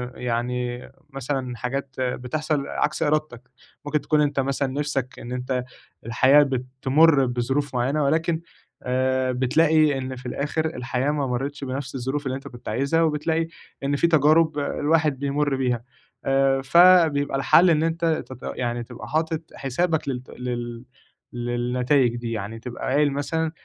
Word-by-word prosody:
ع - - -13
يعني 125 +1 -3 0.2
مثلًا 135 -2 -4
حاجات 135 +2 -4
بتحصل 140 +4 -2
عكس - - -1
إرادتك، 145 -5 -1 0.4
ممكن 150 0 0
تكون 150 -1 +2
أنت 145 -1 0
مثلًا 140 +1 0
نِفْسك 140 -3 -3
إن 120 - -8
أنت 125 0 -2 0.4
الحياة 130 +5 +5
بتمُرّ 135 +3 +2
بظروف 130 +3 -1
معيّنة 135 +5 +1
ولكن 160 +3 +1 0.4
آآ 130 0 +1
بتلاقي 150 +3 +3
إن 130 0 -4
في 125 0 -12
الآخِر 145 +5 -2
الحياة 130 -2 -1
ما 145 -2 -1
مرّتش 135 +3 -3
بنَفْس 135 0 -5
الظروف 135 +3 -3
اللي 130 0 -1
أنت 135 - -8
كنت 120 -1 -9
عايزها، 140 +8 +1
وبتلاقي 160 +1 0 0.4
إن 140 +1 0
في 170 - +3
تجارب 155 0 +4
الواحد 150 0 +1
بيمُرّ 140 0 0
بيها 125 -3 -1 0.4
آآ 135 0 +2
فبيبقى 160 -2 +5
الحَل 175 +6 +5
إن 160 -1 +3
أنت 165 +1 -1 0.2
تبق 130 -1 -6
يعني 120 -1 -2
تبقى 120 0 -10
حاطط 160 0 -1
حسابك 155 +3 -1
للت 125 -1 -5
لل 120 -1 -5 0.5
للنتايج 120 +1 +1
دي 120 -1 -4
يعني، 110 +1 -5
تبقى 120 +1 -7
قايل 145 0 +3
مثلًا 160 +3 -1
135 Hz, 145 wpm, -24 LUFS, 125-150 Hz, 0.5 s, الحياة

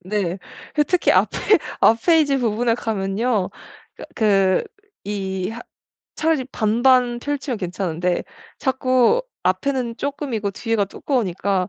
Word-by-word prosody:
네. 190 -1 -2 0.4
예 - - +7
특히 360 +4 +2
앞에 - - +2 0.4
앞 225 - +5
페이지 315 -5 +4
부분에 230 0 +1
가면요. 210 -1 -1 0.6
그 195 -4 +3 0.4
이 190 -2 -3
하 235 +1 -7 0.6
차라리 315 -4 +1
반반 240 +2 +3
펼치면 280 -4 -3
괜찮은데 180 -2 -2 0.4
자꾸 255 - +2 0.2
앞에는 235 +6 0
쪼끔이고 265 -7 -3
뒤에가 225 0 0
두꺼우니까 195 - -1
225 Hz, 245 characters per minute, -21 LUFS, 195-260 Hz, 0.6 s, 예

